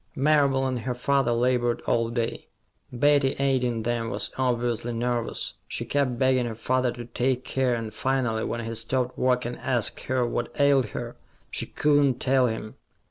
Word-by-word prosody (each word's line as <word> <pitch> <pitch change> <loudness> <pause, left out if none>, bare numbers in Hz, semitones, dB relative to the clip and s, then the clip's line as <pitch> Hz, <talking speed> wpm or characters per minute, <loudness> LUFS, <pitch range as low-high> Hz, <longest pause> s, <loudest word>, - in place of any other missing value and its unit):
Marable 140 -2 +3
and 130 -2 -1
her 125 +1 -3
father 135 0 +1
labored 120 0 +1
all 115 -1 +1
day. 115 -1 -3 0.4
Betty, 140 +1 +3
aiding 125 -4 +1
them, 115 0 -1
was - - -1
obviously 120 -2 -1
nervous. 120 0 -2
She - - -4
kept 135 -4 0
begging 130 -1 +2
her 115 - -5
father 125 +2 0
to 120 -1 -8
take 125 +2 -1
care, 130 -2 +1
and 115 -2 -5
finally, 120 -3 0
when 115 -1 -3
he 115 - -4
stopped 125 +3 -1
work 125 -1 +1
and 120 0 -5
asked 120 -4 -1
her 130 -1 +1
what 120 +3 -3
ailed 140 -4 +4
her, - - -6 0.3
she - - -3
could 145 -1 +3
not 130 -3 +1
tell 130 -1 +3
him. 110 -1 -5
125 Hz, 175 wpm, -26 LUFS, 120-130 Hz, 0.4 s, ailed